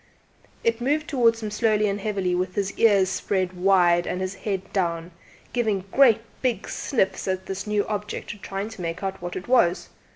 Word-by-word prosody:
It 230 +1 +1
moved 300 +4 0
towards 230 -4 +2
him 210 - -3
slowly 215 -1 +2
and 200 0 -2
heavily 195 -4 -1
with 185 +1 -2
its 200 -1 0
ears 200 -4 +4
spread 185 -1 -1
wide 180 -2 +3
and 180 - -2
its 185 0 -2
head 195 -1 -4
down, 170 -3 -1 0.4
giving 215 -6 0
great 250 -5 +5 0.2
big 250 -3 -1
sniffs 210 -10 -1
at 185 0 -2
this 195 +2 -5
new 210 -1 +1
object, 210 -1 -5
trying 195 +2 -4
to 225 -4 -9
make 170 +2 -4
out 195 -1 -3
what 175 0 -5
it 185 - -6
was. 215 -9 +3
195 Hz, 185 wpm, -24 LUFS, 185-220 Hz, 0.4 s, great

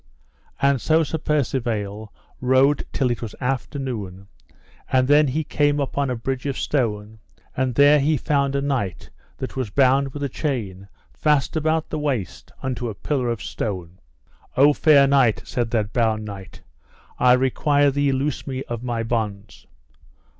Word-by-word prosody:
And 140 -2 +2
so 160 +1 +3
Sir 160 +1 -3
Percivale 115 -8 -2 0.3
rode 130 +3 +3
till 130 -3 0
it 120 - -3
was 115 -3 -6
after 135 +2 -2
noon, 100 -8 -5 0.6
and 130 -1 +3
then 145 +1 +5
he 150 +5 -1
came 145 0 +1
upon 140 0 -1
a 125 - -1
bridge 130 +3 -3
of 140 - -2
stone, 110 -5 -2 0.4
and 130 -2 -1
there 145 +2 +6
he 150 +2 +2
found 140 -1 0
a 140 - +1
knight 125 -11 -3 0.3
that 130 - -6
was 130 -5 -2
bound 135 +3 +3
with 145 +1 -6
a - - +1
chain 110 - -4 0.3
fast 150 -2 +1
about 160 0 0
the 155 - -2
waist 120 - -3
unto 125 -2 -3
a 105 - -6
pillar 130 +3 -1
of 115 -5 -3
stone. 90 -4 -5 0.6
O 145 +3 +6
fair 145 -2 +5
knight, 135 -5 +3
said 120 -2 -2
that 110 -3 -1
bound 110 -3 +1
knight, 100 -2 -10 0.6
I 125 0 +6
require 140 +3 +2
thee 145 0 +1
loose 135 +2 -2
me 130 -1 -3
of 120 -1 -6
my 120 -2 -2
bonds. 110 -4 -4
130 Hz, 160 wpm, -22 LUFS, 115-140 Hz, 0.6 s, there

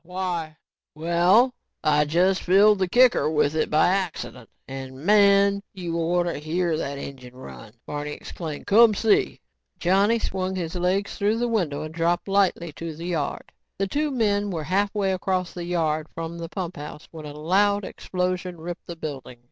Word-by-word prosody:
"Yeh, 170 - -24
why?" 170 -4 -3 0.4
"Well, 175 +10 +3 0.3
I 150 0 +3
just 180 +5 +2
filled 200 +3 +5
the 185 - +1
kicker 245 -3 +4
with 150 -1 +1
it 155 - 0
by 155 - +4
accident, 185 - -3 0.2
and 135 -1 -7
man, 200 -1 +5
you 175 -3 -4
orter 175 +1 0
hear 165 +2 -1
that 140 -3 -3
engine 130 -3 -9
run," 115 -4 -11
Barney 150 0 -4
exclaimed. 155 -2 -7
"Come 220 +1 +6
see." 215 - +1 0.4
Johnny 200 +6 +3
swung 190 -3 -3
his 170 -3 -4
legs 185 +3 -1
through 210 +2 +2
the 240 +1 0
window 170 -11 -1
and 155 0 -7
dropped 170 +2 0
lightly 195 -4 +1
to 165 +2 -6
the 165 +2 -8
yard. 165 -5 -3 0.3
The 195 - 0
two 295 +9 -1
men 205 -6 +1
were 165 -5 -3
halfway 195 +3 0
across 185 -1 -1
the 175 -1 -6
yard 160 -3 -1
from 165 +1 -5
the 165 0 -6
pumphouse 165 -5 -6
when 155 -2 -9
a 145 - -8
loud 200 +5 +2
explosion 180 -1 -3
ripped 170 +2 -7
the 170 - -6
building. 140 -6 -7
175 Hz, 170 wpm, -24 LUFS, 155-195 Hz, 0.4 s, Come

